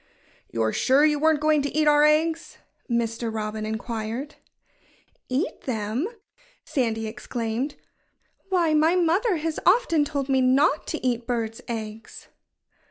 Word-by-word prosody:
"You're 110 Hz, -1 st, -1 dB
sure 275 Hz, +3 st, +4 dB
you 300 Hz, -1 st, +2 dB
weren't 315 Hz, 0 st, +3 dB
going 305 Hz, -1 st, +3 dB
to 285 Hz, -, -2 dB
eat 305 Hz, 0 st, +1 dB
our 295 Hz, 0 st, +5 dB
eggs?" 320 Hz, +2 st, +1 dB, 0.3 s
Mr. 230 Hz, -1 st, -1 dB
Robin 215 Hz, 0 st, -4 dB
inquired. 225 Hz, +5 st, -4 dB, 1.0 s
"Eat 275 Hz, -, -2 dB
them!" 225 Hz, -, -1 dB, 0.6 s
Sandy 225 Hz, -4 st, -1 dB
exclaimed. 235 Hz, +3 st, -4 dB, 0.7 s
"Why, 345 Hz, -4 st, +2 dB
my 315 Hz, +3 st, +4 dB
mother 365 Hz, +5 st, +2 dB
has 320 Hz, 0 st, -2 dB
often 360 Hz, -6 st, +4 dB
told 280 Hz, -2 st, -3 dB
me 265 Hz, -1 st, +2 dB
not 275 Hz, +4 st, +3 dB
to 320 Hz, -, -4 dB
eat 240 Hz, -2 st, -1 dB
birds' 230 Hz, -2 st, -2 dB
eggs." 225 Hz, -1 st, -7 dB
265 Hz, 130 wpm, -25 LUFS, 225-310 Hz, 1.0 s, our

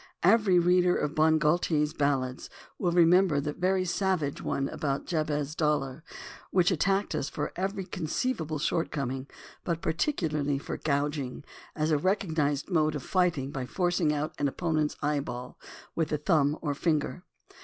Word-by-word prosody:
Every 195 Hz, -1 st, +5 dB
reader 180 Hz, +1 st, +4 dB
of 150 Hz, -, -1 dB
Bon 155 Hz, 0 st, +4 dB
Gaultier's 150 Hz, -1 st, +1 dB
Ballads 135 Hz, -4 st, -1 dB, 0.3 s
will 180 Hz, -, +1 dB
remember 175 Hz, -2 st, +5 dB
the 145 Hz, +1 st, -3 dB
veiy 185 Hz, +2 st, 0 dB
savage 180 Hz, -6 st, 0 dB
one 135 Hz, 0 st, -1 dB
about 140 Hz, -1 st, -2 dB
Jabez 150 Hz, -3 st, -1 dB
Dollar, 150 Hz, -2 st, -1 dB, 0.5 s
which 180 Hz, 0 st, +3 dB
at 175 Hz, -, 0 dB
tacked 195 Hz, +2 st, +1 dB
us 150 Hz, -2 st, -2 dB
for -, -, -4 dB
every 195 Hz, +1 st, -2 dB
conceivable 160 Hz, -, -2 dB
shortcoming, 140 Hz, -4 st, -2 dB, 0.4 s
but 170 Hz, -2 st, -1 dB
par -, -, +1 dB
ticularly 150 Hz, -, 0 dB
for -, -, -5 dB
"gouging" 145 Hz, -2 st, -2 dB, 0.3 s
as 155 Hz, +1 st, 0 dB
a 150 Hz, -, +3 dB
recognized 160 Hz, -6 st, 0 dB
mode 155 Hz, -4 st, +1 dB
of 145 Hz, -, -4 dB
fight 180 Hz, -4 st, +2 dB
ing 135 Hz, +1 st, -4 dB
by 130 Hz, -3 st, -4 dB
forcing 175 Hz, -2 st, +1 dB
out 150 Hz, +2 st, -2 dB
an 145 Hz, -, +2 dB
opponent's 155 Hz, 0 st, -1 dB
eyeball 140 Hz, -4 st, -3 dB, 0.3 s
with 160 Hz, -2 st, -1 dB
the 150 Hz, -, 0 dB
thumb 150 Hz, -2 st, +2 dB
or 145 Hz, -2 st, 0 dB
finger. 155 Hz, +3 st, -1 dB
155 Hz, 155 wpm, -28 LUFS, 145-180 Hz, 0.5 s, Every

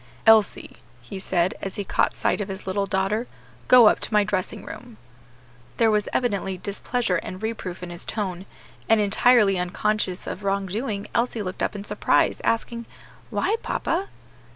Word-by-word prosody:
"Elsie," 220 Hz, -3 st, +4 dB, 0.2 s
he 120 Hz, +11 st, -8 dB
said, 185 Hz, -1 st, +1 dB
as 195 Hz, -, -5 dB
he 205 Hz, -, -3 dB
caught -, -, +1 dB
sight -, -, 0 dB
of 200 Hz, -, -3 dB
his 195 Hz, 0 st, -7 dB
little 195 Hz, +1 st, -1 dB
daughter, 195 Hz, +5 st, 0 dB, 0.4 s
"go 250 Hz, -2 st, +8 dB
up -, -, +4 dB
to -, -, -2 dB
my 210 Hz, -1 st, +4 dB
dressing 200 Hz, +1 st, -3 dB
room." 240 Hz, -2 st, -10 dB, 0.8 s
There 225 Hz, -1 st, +4 dB
was 210 Hz, -1 st, +1 dB
evidently 200 Hz, -6 st, -1 dB
displeasure 200 Hz, +2 st, -1 dB
and 185 Hz, -, -6 dB
reproof 205 Hz, -5 st, -5 dB
in 175 Hz, -, -6 dB
his 175 Hz, +1 st, -6 dB
tone, 190 Hz, -3 st, -4 dB, 0.4 s
and, 225 Hz, -1 st, +5 dB
entirely 210 Hz, -1 st, +4 dB
unconscious 185 Hz, +1 st, -1 dB
of 205 Hz, -, -6 dB
wrongdoing, 200 Hz, +2 st, -2 dB
Elsie 235 Hz, -2 st, 0 dB
looked 185 Hz, -1 st, -5 dB
up -, -, -1 dB
in 200 Hz, -, -5 dB
surprise, -, -, +1 dB
asking, 235 Hz, 0 st, -1 dB, 0.4 s
"Why, 440 Hz, -, 0 dB
papa?" 370 Hz, +4 st, -1 dB
205 Hz, 160 wpm, -24 LUFS, 190-225 Hz, 0.8 s, go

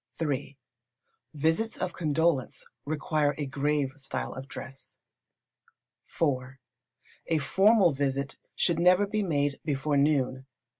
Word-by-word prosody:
iii. 140 Hz, -3 st, -2 dB, 0.8 s
Visits 160 Hz, +10 st, 0 dB
of 180 Hz, -1 st, -3 dB
condolence 160 Hz, -3 st, 0 dB, 0.2 s
require 150 Hz, 0 st, 0 dB
a 150 Hz, -, -2 dB
grave 140 Hz, 0 st, 0 dB
style 135 Hz, -1 st, -4 dB
of 130 Hz, +1 st, -8 dB
dress. 135 Hz, 0 st, -10 dB, 1.2 s
iv. 130 Hz, -4 st, 0 dB, 0.7 s
A 165 Hz, -, +2 dB
formal 190 Hz, -, +4 dB
visit 135 Hz, 0 st, -2 dB, 0.2 s
should 170 Hz, -2 st, +1 dB
never 180 Hz, +3 st, +5 dB
be 210 Hz, +1 st, -1 dB
made 145 Hz, -6 st, 0 dB
before 145 Hz, 0 st, 0 dB
noon. 135 Hz, -2 st, +1 dB
145 Hz, 110 wpm, -28 LUFS, 135-165 Hz, 1.2 s, never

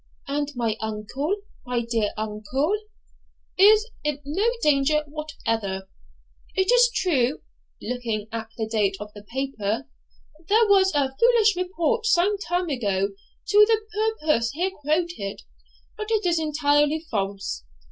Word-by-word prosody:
'And 290 Hz, +1 st, -1 dB
my 230 Hz, -3 st, -1 dB
uncle, 220 Hz, -, -2 dB, 0.3 s
my 245 Hz, -1 st, -1 dB
dear 230 Hz, -3 st, 0 dB
uncle?' 220 Hz, -, -1 dB, 0.8 s
'Is 425 Hz, +3 st, +6 dB, 0.2 s
in 300 Hz, -1 st, -1 dB
no 385 Hz, +11 st, +1 dB
danger 300 Hz, +1 st, +3 dB
whatever. 225 Hz, -11 st, -4 dB, 0.7 s
It 380 Hz, +3 st, +2 dB
is -, -, +6 dB
true 285 Hz, -, +1 dB, 0.4 s
(looking 230 Hz, -4 st, -3 dB
at 225 Hz, 0 st, -4 dB
the 220 Hz, -, -1 dB
date 205 Hz, -3 st, 0 dB
of 210 Hz, 0 st, -8 dB
the 205 Hz, -, -10 dB
paper) 240 Hz, 0 st, -3 dB, 0.6 s
there 440 Hz, +2 st, +5 dB
was 385 Hz, -1 st, +5 dB
a 270 Hz, -2 st, +1 dB
foolish 455 Hz, -, +4 dB
report 365 Hz, +5 st, 0 dB
some 400 Hz, +1 st, +3 dB
time 355 Hz, -2 st, -1 dB
ago 200 Hz, -7 st, 0 dB, 0.4 s
to 410 Hz, -, +3 dB
the 445 Hz, -1 st, +3 dB, 0.4 s
purport 305 Hz, -7 st, +2 dB
here 360 Hz, +6 st, -1 dB
quoted, 310 Hz, -, -2 dB, 0.5 s
but 430 Hz, -1 st, -5 dB
it 435 Hz, -3 st, +1 dB
is 340 Hz, -2 st, +2 dB
entirely 300 Hz, 0 st, +2 dB
false. 195 Hz, -, -2 dB
290 Hz, 130 wpm, -24 LUFS, 225-365 Hz, 0.8 s, Is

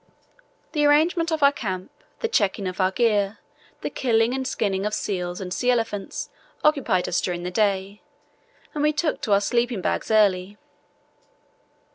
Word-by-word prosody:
The 300 Hz, -2 st, 0 dB
arrangement 330 Hz, +3 st, +3 dB
of 315 Hz, -2 st, 0 dB
our 280 Hz, -, +7 dB
camp, 185 Hz, -8 st, -5 dB, 0.3 s
the 460 Hz, -, +1 dB
checking 200 Hz, -, 0 dB
of 185 Hz, +1 st, -3 dB
our 185 Hz, -, +4 dB
gear, 205 Hz, 0 st, +1 dB, 0.4 s
the -, -, -3 dB
killing 230 Hz, -1 st, +2 dB
and 265 Hz, 0 st, -2 dB
skinning 195 Hz, -6 st, -1 dB
of 210 Hz, +1 st, -1 dB
seals 180 Hz, -3 st, -3 dB
and 180 Hz, -2 st, -5 dB
sea 245 Hz, +6 st, 0 dB
elephants 225 Hz, -5 st, -1 dB, 0.3 s
occupied 270 Hz, -, +2 dB
us 175 Hz, -, 0 dB
during 175 Hz, -1 st, -3 dB
the 180 Hz, -, -3 dB
day, 200 Hz, 0 st, 0 dB, 0.7 s
and 300 Hz, -, -2 dB
we 300 Hz, +1 st, +3 dB
took 305 Hz, +1 st, -1 dB
to 210 Hz, -, +1 dB
our 200 Hz, -, +5 dB
sleeping 235 Hz, +1 st, 0 dB
bags -, -, -1 dB
early. 205 Hz, -2 st, +2 dB
210 Hz, 160 wpm, -24 LUFS, 190-265 Hz, 0.7 s, our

